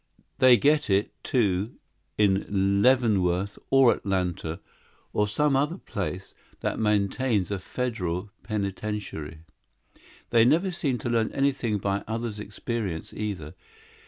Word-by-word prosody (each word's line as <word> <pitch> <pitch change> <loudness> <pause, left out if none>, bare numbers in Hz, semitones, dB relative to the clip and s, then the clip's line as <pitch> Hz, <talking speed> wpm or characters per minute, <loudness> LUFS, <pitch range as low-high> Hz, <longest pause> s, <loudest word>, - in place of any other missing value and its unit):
They 130 -2 +7
get 150 0 +2
it, 100 +2 +1
too, 105 -3 0 0.4
in 100 -1 +2
Leavenworth 100 -7 +2
or 135 -3 +6
Atlanta 90 -4 -2 0.5
or 105 - +2
some 145 +6 +1
other 150 +6 +1
place 95 - -5 0.3
that - - -2
maintains 105 0 +1
a 100 - -1
federal 100 -4 -3
penitentiary. 100 -6 -4 0.9
"They 115 -1 +6
never 170 +10 +3
seem 145 -8 -1
to 120 - -4
learn 115 -1 +1
anything 135 -6 +1
by 100 0 -1
others' 115 -1 -3
experience, 105 -4 -4
either. 100 -8 -4
105 Hz, 115 wpm, -26 LUFS, 95-125 Hz, 0.9 s, They